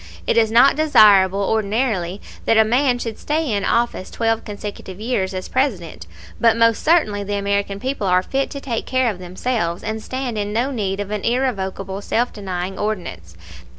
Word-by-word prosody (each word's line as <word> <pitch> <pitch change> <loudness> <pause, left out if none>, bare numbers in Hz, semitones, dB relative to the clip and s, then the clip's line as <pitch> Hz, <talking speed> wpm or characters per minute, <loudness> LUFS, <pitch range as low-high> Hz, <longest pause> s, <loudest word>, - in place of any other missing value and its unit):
It - - +1
is 225 -1 +4
not 240 +5 +5
desirable 200 -10 +5
ordinarily 205 -3 -1 0.3
that 225 - +3
a 220 - +6
man 250 +2 +2
should 230 -2 -5
stay 305 -2 -1
in 200 -1 0
office 235 -5 0
twelve 225 -1 -1
consecutive 205 -2 -8
years 215 -4 -1
as 185 -1 -5
President; 190 - -2 0.3
but 230 -1 +4
most 230 -1 +3
certainly 260 -12 +2
the 205 +1 -3
American 200 0 -1
people 260 -4 -2
are 180 0 +3
fit 275 +6 -1
to 280 - -6
take 240 -5 -4
care 255 -2 +1
of 185 - -10
themselves, 180 -1 -3
and 220 +1 -3
stand 255 -2 -4
in 205 0 -2
no 240 +6 0
need 200 -6 -2
of 205 0 -4
an 210 -1 -2
irrevocable 195 -6 -2
self 240 +4 -1
denying 190 -2 -5
ordinance. 170 - -4
215 Hz, 180 wpm, -20 LUFS, 195-245 Hz, 0.3 s, a